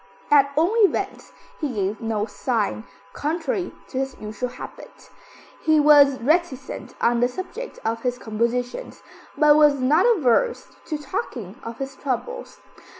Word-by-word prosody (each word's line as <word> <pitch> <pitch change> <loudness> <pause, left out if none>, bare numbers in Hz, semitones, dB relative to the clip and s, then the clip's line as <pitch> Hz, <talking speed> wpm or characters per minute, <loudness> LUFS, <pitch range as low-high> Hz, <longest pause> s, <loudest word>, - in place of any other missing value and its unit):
At 280 -1 +5
all 330 +7 +3
events, 415 -4 +1 0.3
he 285 -6 -3
gave 200 +1 -2
no 220 -2 -1
sign, 225 -1 -2 0.3
contrary 325 +3 -2 0.2
to 260 - -3
his 265 -1 -3
usual 215 +4 -4
habit. 245 - -11 0.5
He 315 -1 +4
was 290 -2 +6
reticent 265 -3 -1
on 235 0 +2
the 245 - +4
subject 375 - -7
of 225 +1 -1
his 245 0 -1
compositions, 245 - -3 0.3
but 300 -1 +6
was 295 -2 +5
not 280 - +4
averse 455 - +2 0.2
to 310 - -2
talking 260 - -5
of 230 0 -7
his 270 0 -5
troubles. 485 - -4
270 Hz, 140 wpm, -23 LUFS, 235-310 Hz, 0.5 s, was